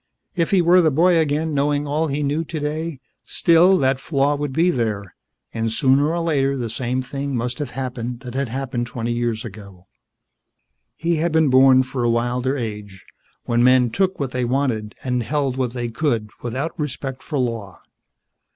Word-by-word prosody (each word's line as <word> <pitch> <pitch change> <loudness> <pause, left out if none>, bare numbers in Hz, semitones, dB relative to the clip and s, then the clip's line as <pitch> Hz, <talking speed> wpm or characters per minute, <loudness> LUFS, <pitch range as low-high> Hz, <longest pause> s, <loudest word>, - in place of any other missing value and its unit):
If 170 -3 0
he 190 -3 +3
were 180 +2 +6
the 160 - +4
boy 170 +4 +4
again 155 +1 0
knowing 145 +1 +1
all 150 +3 0
he 145 +1 -2
knew 145 +3 0
today, 155 -1 -4 0.2
still 175 +3 +4
the 135 -3 +3
flaw 140 0 +1
would 145 -1 -3
be 165 +6 +2
there 105 - -2 0.4
and 115 0 -1
sooner 135 +5 +3
or 170 +1 -1
later 140 -4 +1
the 120 -3 -3
same 125 +2 -2
thing 140 +1 -4
must 125 +3 -3
have 145 -4 -3
happened 125 -2 -4
that 125 -2 -8
had 135 0 -1
happened 120 -1 -3
twenty 120 -1 -3
years 120 -1 -2
ago. 100 -4 -11 1.1
He 170 0 0
had 165 +2 0
been 160 -2 +3
born 130 0 +6
for 130 -1 -4
a 120 - +2
wilder 120 +3 0
age, 105 -5 -6 0.4
when 120 0 +2
men 125 -1 +4
took 190 +7 0
what 135 -3 -2
they 125 -1 -1
wanted 120 -4 -1
and 125 -1 0
held 140 +1 -1
what 125 -3 -2
they 120 -1 -3
could 115 -4 -1
without 135 +8 -4
respect 135 -2 -4
for 150 - -4
law. 115 -7 -3
130 Hz, 180 wpm, -21 LUFS, 120-150 Hz, 1.1 s, were